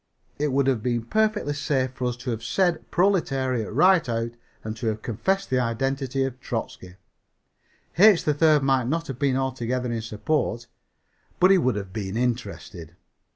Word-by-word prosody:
It 150 Hz, -, +1 dB
would 135 Hz, 0 st, +2 dB
have 130 Hz, -5 st, +1 dB
been 120 Hz, -1 st, -1 dB
perfectly 215 Hz, -, 0 dB
safe 135 Hz, -3 st, -1 dB
for 125 Hz, -1 st, -3 dB
us 120 Hz, -1 st, -3 dB
to 125 Hz, -, -1 dB
have 115 Hz, -1 st, -4 dB
said 175 Hz, +5 st, 0 dB
"proletariat" 135 Hz, -, +1 dB
right 165 Hz, -, +4 dB
out 115 Hz, 0 st, -1 dB, 0.3 s
and 110 Hz, 0 st, -5 dB
to 115 Hz, -, -3 dB
have 110 Hz, 0 st, -2 dB
confessed 190 Hz, -, -1 dB
the 130 Hz, -, +3 dB
identity 135 Hz, +3 st, -1 dB
of 130 Hz, -1 st, -4 dB
Trotzky. 105 Hz, -7 st, -6 dB, 1.0 s
H. 205 Hz, -3 st, +7 dB
3rd 150 Hz, -1 st, +3 dB
might 135 Hz, -3 st, +2 dB
not 165 Hz, +4 st, -1 dB
have 135 Hz, -4 st, -7 dB
been 140 Hz, -2 st, +1 dB
altogether 125 Hz, -2 st, -2 dB
in 115 Hz, -1 st, -2 dB
support, 120 Hz, +2 st, -2 dB, 0.7 s
but 185 Hz, +1 st, +6 dB
he 195 Hz, -, +6 dB
would 130 Hz, -8 st, +1 dB
have 100 Hz, -2 st, -6 dB
been 100 Hz, -1 st, -4 dB
interested. 85 Hz, -, -4 dB
130 Hz, 165 wpm, -24 LUFS, 115-150 Hz, 1.0 s, H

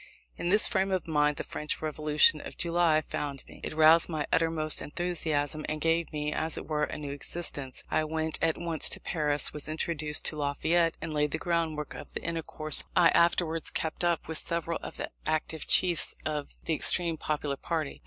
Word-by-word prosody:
In 175 Hz, -, -3 dB
this 210 Hz, +3 st, +6 dB
frame 195 Hz, -2 st, 0 dB
of 185 Hz, -3 st, -1 dB
mind 150 Hz, -2 st, +1 dB
the -, -, -3 dB
French 150 Hz, -, -4 dB
Revolution 150 Hz, 0 st, +3 dB
of -, -, -9 dB
July 170 Hz, -2 st, +2 dB
found 140 Hz, -2 st, -5 dB
me: -, -, -14 dB
It -, -, -5 dB
roused 160 Hz, +2 st, +6 dB
my 155 Hz, -3 st, -2 dB
utmost 165 Hz, -2 st, +2 dB
enthusiasm, 155 Hz, -3 st, -2 dB
and 155 Hz, 0 st, -3 dB
gave 165 Hz, +1 st, 0 dB
me, 150 Hz, -1 st, -3 dB
as 160 Hz, 0 st, -1 dB
it -, -, -6 dB
were, 150 Hz, -1 st, 0 dB
a -, -, -7 dB
new 145 Hz, -2 st, -6 dB
existence. 140 Hz, -2 st, -4 dB
I 155 Hz, -, +2 dB
went 160 Hz, 0 st, -2 dB
at 165 Hz, 0 st, +1 dB
once 165 Hz, -2 st, +3 dB
to -, -, -2 dB
Paris, 150 Hz, -3 st, 0 dB
was 150 Hz, 0 st, -4 dB
introduced 155 Hz, -1 st, -1 dB
to 155 Hz, -, +1 dB
Lafayette, 165 Hz, +4 st, +1 dB
and 160 Hz, -, -4 dB
laid 150 Hz, 0 st, +1 dB
the -, -, -2 dB
groundwork 165 Hz, -4 st, -2 dB
of -, -, -11 dB
the -, -, -5 dB
intercourse 160 Hz, -2 st, 0 dB
I 165 Hz, -, +6 dB
afterwards 165 Hz, -1 st, +2 dB
kept 160 Hz, +2 st, -3 dB
up 170 Hz, -2 st, 0 dB
with 160 Hz, 0 st, -1 dB
several 170 Hz, 0 st, -2 dB
of -, -, -8 dB
the -, -, -5 dB, 0.2 s
active 155 Hz, 0 st, -2 dB
chiefs 175 Hz, -3 st, +3 dB
of 150 Hz, -2 st, -3 dB
the 165 Hz, -, 0 dB
extreme 170 Hz, +1 st, +5 dB
popular 150 Hz, -2 st, -2 dB
party. 155 Hz, 0 st, -4 dB
155 Hz, 195 wpm, -28 LUFS, 150-165 Hz, 0.2 s, this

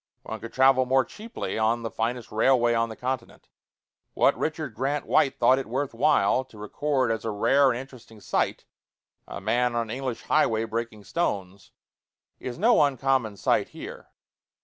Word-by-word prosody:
One -, -, -6 dB
could 115 Hz, -, -8 dB
travel 130 Hz, +1 st, +4 dB
more 130 Hz, +1 st, +3 dB
cheaply 220 Hz, -, -6 dB
on 115 Hz, +2 st, +1 dB
the 115 Hz, -, -4 dB
finest 115 Hz, +2 st, -3 dB
railway 120 Hz, +1 st, +3 dB
on 115 Hz, 0 st, +1 dB
the 110 Hz, -, -7 dB
continent. 130 Hz, -1 st, -5 dB, 0.7 s
What -, -, +4 dB
Richard -, -, -3 dB
Grant 140 Hz, +5 st, -2 dB
White 135 Hz, -, +2 dB
thought 130 Hz, +2 st, +4 dB
it 135 Hz, -, -6 dB
worth 130 Hz, +3 st, -2 dB
while 130 Hz, -2 st, +3 dB
to 130 Hz, -4 st, -18 dB
record 130 Hz, +4 st, -1 dB
as 110 Hz, -1 st, -2 dB
a 115 Hz, -, -2 dB
rare 135 Hz, +6 st, +3 dB
and 120 Hz, -, 0 dB
interesting 125 Hz, -4 st, -12 dB
sight -, -, -1 dB, 0.6 s
a -, -, -7 dB
man 120 Hz, +4 st, 0 dB
on 115 Hz, -2 st, -2 dB
an -, -, -3 dB
English 130 Hz, -3 st, -4 dB
highway 115 Hz, -7 st, +2 dB
breaking 115 Hz, -2 st, -4 dB
stones 100 Hz, -, -3 dB, 0.7 s
is 125 Hz, -, -6 dB
no 225 Hz, +3 st, +4 dB
uncommon 135 Hz, -6 st, +1 dB
sight -, -, +1 dB
here. -, -, -9 dB
120 Hz, 170 wpm, -26 LUFS, 115-135 Hz, 0.7 s, travel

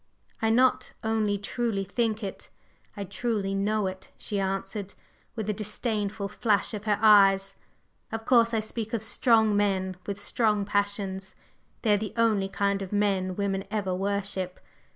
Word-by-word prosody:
"I 220 Hz, -, +2 dB
not 255 Hz, +2 st, +3 dB
only 220 Hz, -2 st, +1 dB
truly 205 Hz, 0 st, -2 dB
think 220 Hz, +2 st, -1 dB
it, 195 Hz, -, -6 dB, 0.5 s
I 200 Hz, -, -3 dB
truly 200 Hz, 0 st, -2 dB
know 205 Hz, +1 st, +1 dB
it!" 190 Hz, 0 st, -5 dB
she 205 Hz, -, -3 dB
answered, 195 Hz, +1 st, -3 dB, 0.4 s
with 220 Hz, -3 st, -4 dB
a 210 Hz, -, +1 dB
disdainful 210 Hz, -1 st, -2 dB
flash 210 Hz, +1 st, 0 dB
of 210 Hz, 0 st, -5 dB
her 210 Hz, -2 st, +2 dB
eyes. 195 Hz, -2 st, +6 dB, 0.5 s
"Of 225 Hz, 0 st, -4 dB
course, 230 Hz, -2 st, +5 dB
I 225 Hz, -2 st, +1 dB
speak 220 Hz, +1 st, -5 dB
of 225 Hz, -2 st, -1 dB
strong 220 Hz, -1 st, +3 dB
men 190 Hz, -2 st, 0 dB
with 200 Hz, -1 st, -3 dB
strong 210 Hz, 0 st, +1 dB
passions; 200 Hz, -2 st, -2 dB, 0.5 s
they 215 Hz, -3 st, +4 dB
are -, -, +4 dB
the 210 Hz, 0 st, -4 dB
only 215 Hz, -4 st, +2 dB
kind 200 Hz, 0 st, 0 dB
of 190 Hz, -, -6 dB
men 195 Hz, -3 st, +1 dB
women 195 Hz, -1 st, -1 dB
ever 200 Hz, -3 st, -1 dB
worship. 195 Hz, -1 st, -2 dB
205 Hz, 155 wpm, -27 LUFS, 195-220 Hz, 0.5 s, eyes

